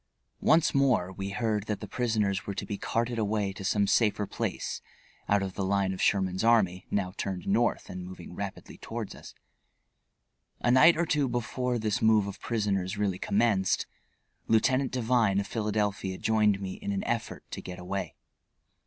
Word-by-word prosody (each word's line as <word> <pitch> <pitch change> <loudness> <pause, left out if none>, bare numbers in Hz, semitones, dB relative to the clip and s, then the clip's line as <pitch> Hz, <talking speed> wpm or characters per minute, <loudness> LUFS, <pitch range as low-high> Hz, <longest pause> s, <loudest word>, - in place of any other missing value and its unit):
Once 160 0 +4
more 130 -10 +2
we 95 +1 -4
heard 110 -1 -1
that 105 -2 -2
the - - -7
prisoners 105 -6 0
were 100 - -3
to - - -3
be 105 - -4
carted 115 +3 -1
away 105 -2 0
to 100 - -8
some 100 +1 +2
safer 105 0 +2
place, - - -3 0.5
out 100 -1 +3
of 95 -1 -4
the 100 - -3
line 95 0 +1
of 95 - -5
Sherman's 95 -1 +1
army, 95 -6 +3
now 95 -3 -1
turned 95 -2 -3
North 115 +4 +1
and 90 0 -6
moving 90 -1 -9
rapidly 100 +1 -7
toward - - -6
us. - - -12 1.2
A 120 - +2
night 155 +7 +7
or 170 - +2
two 150 -3 +1
before 125 +1 -1
this 110 +1 -1
move 110 -2 +4
of 100 0 -7
prisoners 100 -5 -1
really 100 -3 0
commenced 105 -3 +1 0.6
Lieutenant 130 +4 +3
Devine 115 -5 +2
of 100 - -2
Philadelphia 105 -3 -1
joined 105 -2 +2
me 95 -1 -4
in - - -5
an 100 -1 -2
effort 120 -1 -3
to - - -5
get 90 0 -8
away. 90 0 -4
105 Hz, 170 wpm, -29 LUFS, 95-115 Hz, 1.2 s, night